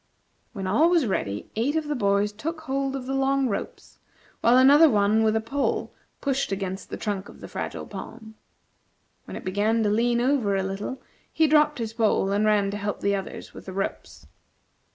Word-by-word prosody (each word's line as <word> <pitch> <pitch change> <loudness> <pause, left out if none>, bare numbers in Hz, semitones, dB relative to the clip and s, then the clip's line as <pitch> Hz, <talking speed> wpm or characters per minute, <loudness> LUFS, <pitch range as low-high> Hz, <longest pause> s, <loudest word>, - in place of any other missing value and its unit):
When 195 -4 -5
all 260 - +3
was 340 -5 +3
ready, 105 - -3
eight 250 +8 0
of 315 -2 -1
the 295 - -1
boys 200 -4 +1
took 315 +10 -5
hold 275 -2 -2
of 265 -2 -5
the 265 - -3
long 270 0 +1
ropes, 205 - -6 0.4
while 240 +2 +4
another 285 +5 +7
one 210 0 +3
with 220 0 +2
a - - +3
pole 270 +6 -2 0.3
pushed 275 -4 -1
against 195 -1 -4
the - - -5
trunk 200 -2 -3
of - - -14
the - - -9
Fragile - - -5
Palm. 220 -1 -9 0.9
When - - -7
it - - -10
began 210 +4 +1
to 210 - +2
lean 235 +2 +2
over 245 -6 +1
a 190 - 0
little, 195 +7 -5 0.3
he 320 - +3
dropped 300 0 +4
his 225 -2 -4
pole 220 -4 +1
and 205 +2 +1
ran 205 -2 +2
to 205 - -4
help 205 0 -4
the 200 - +1
others 195 -1 -7
with - - -12
the 190 - -6
ropes. 195 +1 -5
225 Hz, 195 wpm, -25 LUFS, 200-275 Hz, 0.9 s, another